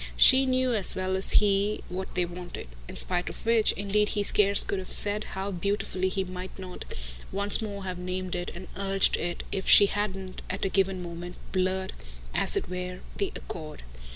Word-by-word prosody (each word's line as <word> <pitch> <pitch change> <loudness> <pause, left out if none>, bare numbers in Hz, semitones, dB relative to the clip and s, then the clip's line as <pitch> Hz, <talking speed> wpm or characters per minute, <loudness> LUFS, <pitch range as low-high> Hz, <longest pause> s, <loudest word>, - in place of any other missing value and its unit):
She 265 0 +7
knew 255 -1 +1
as 205 -4 +2
well 185 0 -1
as 190 - 0
he 205 0 +2
what 185 +1 -6
they 180 -1 +1
wanted; 175 - -8 0.2
in - - -8
spite 180 -1 +2
of - - -11
which 225 -1 +4
indeed 205 +1 +1
he 205 - 0
scarce 200 0 +5
could 195 - -3
have 185 - -7
said 210 +1 +5
how 195 +1 -3
beautifully 190 0 -1
he 190 0 -1
mightn't 185 0 -8 0.5
once 200 +2 +4
more 200 -2 -5
have 185 -1 -5
named 185 0 -4
it 175 0 -3
and 180 +1 -9
urged 195 0 +2
it 175 0 -3
if 190 - -2
she 205 - +9
hadn't, 195 -2 -4
at - - -2
a - - 0
given 190 -1 0
moment, 175 +1 -7 0.2
blurred, 190 0 -1 0.4
as - - +2
it - - -2
were, 180 0 -5 0.2
the 395 -2 -1
accord. 155 -2 -8
190 Hz, 185 wpm, -27 LUFS, 180-205 Hz, 0.5 s, she